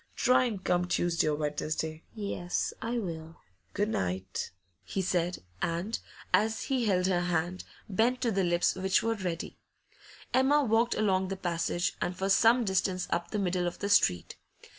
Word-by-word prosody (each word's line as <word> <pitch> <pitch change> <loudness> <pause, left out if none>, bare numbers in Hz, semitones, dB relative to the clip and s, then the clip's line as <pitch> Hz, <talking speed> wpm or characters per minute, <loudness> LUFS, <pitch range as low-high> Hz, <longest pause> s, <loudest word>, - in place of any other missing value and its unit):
Try 255 0 +4
and 210 -6 -3
come 180 0 +2
Tuesday 175 -2 +1
or 150 - +2
Wednesday.' 155 +1 -2
'Yes, 200 -4 -2
I 235 +1 -2
will.' 165 -6 -5 0.4
'Good 205 +1 0
night!' 95 - -2 0.3
he - - -4
said, 180 - 0 0.2
and, 175 +6 -1 0.3
as 220 +1 +2
he 260 -3 0
held 185 -3 +2
her 180 -2 +2
hand, 175 +1 -1 0.2
bent 230 +5 +1
to 235 - +1
the 195 -2 +1
lips 175 0 +2
which 190 0 +1
were 230 - +1
ready. 180 -6 -4 0.7
Emma 280 +3 +4
walked 230 0 +2
along 190 -3 +2
the 195 +1 -4
passage, 175 0 -1
and 180 0 -2
for 195 +1 -1
some 230 +4 +5
distance 190 -1 0
up 170 - -1
the 215 - -2
middle 180 -2 0
of 175 - -4
the 200 - -3
street. 90 - +3
185 Hz, 165 wpm, -30 LUFS, 175-215 Hz, 0.7 s, some